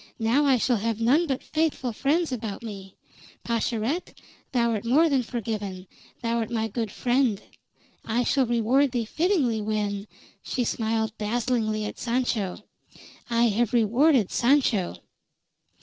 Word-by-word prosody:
Now 235 +6 +2
I 270 -2 +4
shall 245 0 +1
have 225 +1 -2
none 280 +9 +3
but 265 -2 -2
faithful 310 -6 -1
friends 305 +7 +1
about 220 -4 -4
me. 195 -4 -8 0.5
Pascherette, 235 +7 -2 0.3
thou'rt 235 -5 +1
more 280 +8 +4
than 275 -4 +2
forgiven: 210 -6 -4 0.4
thou'rt 230 -1 0
my 225 -2 -1
good 225 0 -3
friend. 245 -1 +1 0.6
I 235 +2 0
shall 265 0 +2
reward 240 +4 +2
thee 235 -2 0
fittingly 290 - +1
when" 210 -1 -2 0.3
she 250 - -2
smiled 220 -1 -1
dazzlingly 220 -1 0
at - - -6
Sancho 230 -5 -1 0.7
"I 235 0 +3
have 230 +2 0
rewarded 235 - +3
Sancho." 240 - +2
235 Hz, 130 wpm, -26 LUFS, 215-255 Hz, 0.7 s, I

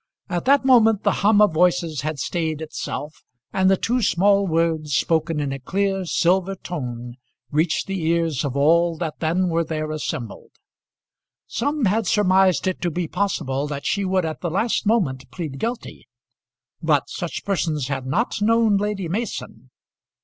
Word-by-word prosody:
At 175 0 -2
that 275 0 +4
moment 225 -5 +5
the 205 - +3
hum 210 +1 +5
of 205 -6 +3
voices 170 -3 +1
had 155 +1 -3
stayed 160 +2 -2
itself, 155 -1 -6 0.3
and 190 0 +3
the 195 - +4
two 245 +5 0
small 200 0 +3
words, 160 -3 0
spoken 160 -1 +1
in 145 -2 -2
a 135 - -5
clear, 195 +6 -1
silver 185 +3 +1
tone, 125 -9 -6 0.3
reached 155 +2 +1
the 195 -3 -3
ears 165 -4 +1
of 140 -2 -3
all 165 +3 +3
that 160 -3 -4
then 170 +3 +1
were 170 -1 +1
there 155 -1 -3
assembled. 135 -7 -5 0.9
Some 285 +2 -1
had 215 +3 +1
surmised 190 -2 +3
it 185 -1 -2
to 175 - 0
be 170 +1 -3
possible 150 -7 -1
that 140 -1 -5
she 200 - 0
would 185 -2 +1
at 155 -5 -5
the 175 - -2
last 205 +5 0
moment 175 - 0
plead 155 -7 -6
guilty, 235 +1 -5 0.7
but - - +2
such - - -5
persons 160 -8 -1
had 135 -2 -3
not 205 - -1
known 225 -1 +3
Lady 205 -3 -2
Mason. 220 +8 -5
175 Hz, 165 wpm, -22 LUFS, 155-200 Hz, 0.9 s, moment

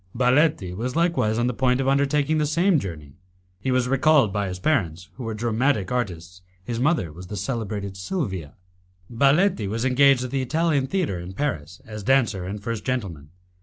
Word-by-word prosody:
Baletti 125 - +2
was 125 +6 -3
likewise 165 -11 +1
on 120 - +1
the 125 - 0
point 125 +1 +1
of 135 - 0
undertaking 140 +2 +2
the 150 - +1
same 170 +2 +3
journey. 75 - -8 0.4
He 130 - -3
was 125 -1 +2
recalled 135 -4 +3
by 105 -1 -1
his 90 0 -5
parents, 90 - -1
who 130 - -9
were 115 -1 -4
dramatic 115 -1 0
artists: 90 -7 -4 0.2
his 115 +2 -4
mother 130 - +1
was 90 +3 -10
the 105 - -6
celebrated 100 -2 -4
Silvia. 95 - -4 0.6
Baletti 140 - +3
was 115 +5 -2
engaged 135 0 +4
at 125 - -5
the 135 -1 0
Italian 150 0 +1
Theatre 160 - -1
in 90 +2 -8
Paris 90 - -4
as 105 -2 -7
dancer 110 -5 +1
and 100 +3 -5
first 115 -1 -3
gentleman. 95 - -4
120 Hz, 180 wpm, -24 LUFS, 95-140 Hz, 0.6 s, engaged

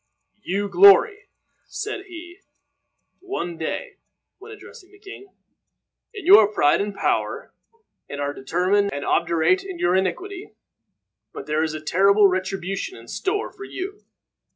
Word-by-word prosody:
"You 200 +2 -2
glory," 200 - +5 0.4
said 420 -2 -6
he, 350 +1 -11 0.8
one 355 - -5
day, 165 - -5 0.4
when 430 +3 -12
addressing 420 -2 -14
the 405 - -18
king, 400 -1 -12 0.8
"in 405 -6 -10
your 380 - +8
pride 150 -6 +2
and 205 +1 -3
power, - - -2 0.6
and 140 - -7
are 145 0 -2
determined 185 +9 0
and 145 0 -5
obdurate 170 - +1
in 380 -2 -8
your 180 - +1
iniquity. 360 - -3 0.8
But - - -8
there 150 +1 -1
is 160 -1 -2
a 155 - -6
terrible 200 +6 +4
retribution 195 - -4
in - - -15
store 405 +2 -3
for 400 - -11
you. 395 +2 -7
205 Hz, 135 wpm, -22 LUFS, -, 0.8 s, your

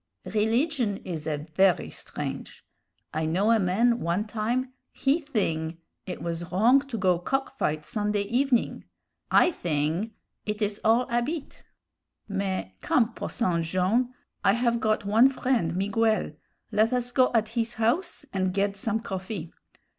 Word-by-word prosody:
Rilligion 225 +1 +1
is 160 -4 -5
a 150 -2 0 0.2
very 190 +1 +3
strange; - - -6 0.5
I 155 0 -1
know 190 +7 +2
a 225 - +5
man 230 +6 +2
one 175 +5 0
time, 235 +4 -2 0.2
he 280 +4 +1
thing 170 - -2 0.3
it 180 - -5
was 170 0 -4
wrong 230 +9 +5
to 245 -4 -4
go 185 -3 +2
to - - -18
cock 270 +2 -2
fight 155 0 0
Sunday 210 0 -1
evening. 245 +3 +1 0.4
I 360 - +5
thing 170 - -1 0.3
it 210 0 -3
is 205 -1 -2
all 230 +3 +4
'abit. 265 +6 -2 0.7
Mais, 195 - -2
come, 230 -1 +2
Posson 180 -9 -1
Jone'; 185 +9 +1 0.3
I - - +5
have 235 0 +1
got 215 -2 +1
one 225 +6 +6
friend, 250 -10 0
Miguel; 215 +2 +1 0.4
led 215 +2 +3
us 245 -1 0
go 255 +1 +4
at 220 -1 +2
his 230 0 -2
house 295 +10 0
and 185 -1 0
ged 200 0 0
some 220 +2 -1
coffee. 190 -4 -5
215 Hz, 145 wpm, -27 LUFS, 185-240 Hz, 0.7 s, one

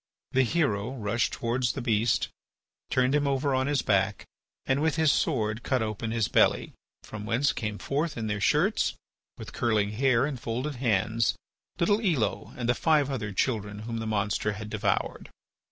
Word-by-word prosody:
The 130 - +3
hero 130 -4 0
rushed 115 0 0
towards 120 0 -1
the - - -4
beast, 115 0 +1 0.6
turned 130 +1 +2
him 145 -1 +2
over 140 0 +1
on 130 +1 +1
his 145 -3 +1
back, 100 0 +1 0.4
and 135 +2 +1
with 160 0 +1
his 160 -3 +4
sword 110 +1 0
cut 125 0 0
open 110 +1 -3
his 115 -2 0
belly, - - +2 0.3
from 105 0 -8
whence 125 +5 +2
came 105 -4 -3
forth 150 +5 -2
in 115 - -3
their 105 -1 -2
shirts, - - +2 0.4
with - - -9
curling 105 -3 +1
hair 125 +2 +2
and 140 -4 -4
folded 125 +5 -3
hands, 115 -1 +1 0.4
little 205 +5 +2
Elo 150 - 0
and 120 -2 -2
the 120 - +4
five 150 0 +2
other 110 -6 -3
children 105 -1 -1
whom 115 0 -4
the 110 - -4
monster 105 0 0
had 105 0 -7
devoured. 110 - -1
115 Hz, 170 wpm, -28 LUFS, 105-135 Hz, 0.6 s, his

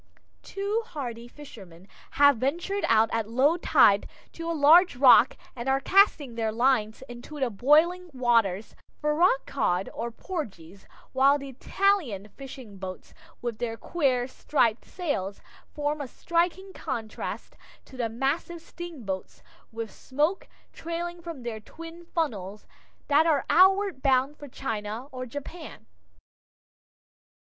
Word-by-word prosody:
Two 405 +3 -2
hardy 240 - -6
fishermen 195 - -13 0.3
have 285 -2 +6
ventured 345 - -2
out 225 0 +4
at 225 -1 -1
low 265 +7 +3
tide 260 -11 +4 0.2
to 330 0 -6
a - - 0
large 335 +4 +7
rock 255 -1 +6 0.2
and 240 +1 -4
are 270 0 +3
casting 310 - +3
their 225 -1 -1
lines 230 -1 +1
into 245 +5 -9
the 260 -3 0
boiling 320 - +3
waters 230 -6 +1 0.2
for 300 0 0
rock 320 -3 +3
cod 185 -8 -1
or 235 - -4
porgies, 200 - -7 0.3
while 275 +2 +4
the 275 -1 -8
Italian 265 - 0
fishing 255 -6 -11
boats, 185 -1 -8 0.3
with 235 -3 -4
their 230 -2 -3
queer 255 -7 0
striped 245 -4 0
sails, 285 - -3 0.3
form 295 0 -2
a 280 - -5
striking 350 +7 -1
contrast 230 -7 -6 0.3
to 265 - -15
the 240 -3 -2
massive 275 +9 -2
steamboats, 280 - -7 0.3
with 225 -1 -6
smoke 300 +8 -1 0.3
trailing 340 +1 -5
from 330 -7 -8
their 230 -2 -5
twin 330 +9 -11
funnels, 210 - -3 0.4
that 300 +3 +4
are 295 -4 +2
outward 380 -4 +4
bound 270 +1 +2
for 290 - -11
China 225 -3 -5
or 255 -1 -6
Japan. 285 - -9
270 Hz, 130 wpm, -27 LUFS, 225-330 Hz, 0.4 s, large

